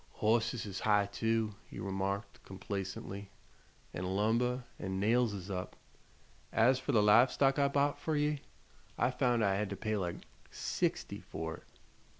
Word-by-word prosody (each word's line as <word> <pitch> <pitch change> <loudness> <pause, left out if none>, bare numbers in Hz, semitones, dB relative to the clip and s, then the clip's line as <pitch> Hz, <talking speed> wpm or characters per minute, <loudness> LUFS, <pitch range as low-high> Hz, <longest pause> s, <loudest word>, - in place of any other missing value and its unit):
"Hosses 110 +1 +1
is 95 -2 -5
high, 105 -2 +3
too," 110 +1 0 0.2
he - - -8
remarked, 100 +2 -3
complacently, 95 0 -5 0.6
"an' 90 - -4
lumber 120 +5 +1 0.2
an' 95 -1 -3
nails 115 +3 +3
is 100 -1 -6
up. 90 -2 -4 0.8
As 125 +3 +4
fer 140 - -2
the 110 -5 +4
live 115 +5 +6
stock 135 0 +2
I 140 - +4
bought 140 +1 +1
fer 160 - -1
ye, 150 -1 +1 0.6
I 120 - +2
found 125 -3 +2
I 100 - +3
had 105 -1 -1
to 100 - -3
pay 110 +2 -1
like 90 -3 -4 0.2
sixty - - -2
for 80 0 -5
it." - - -19
110 Hz, 155 wpm, -33 LUFS, 100-125 Hz, 0.8 s, live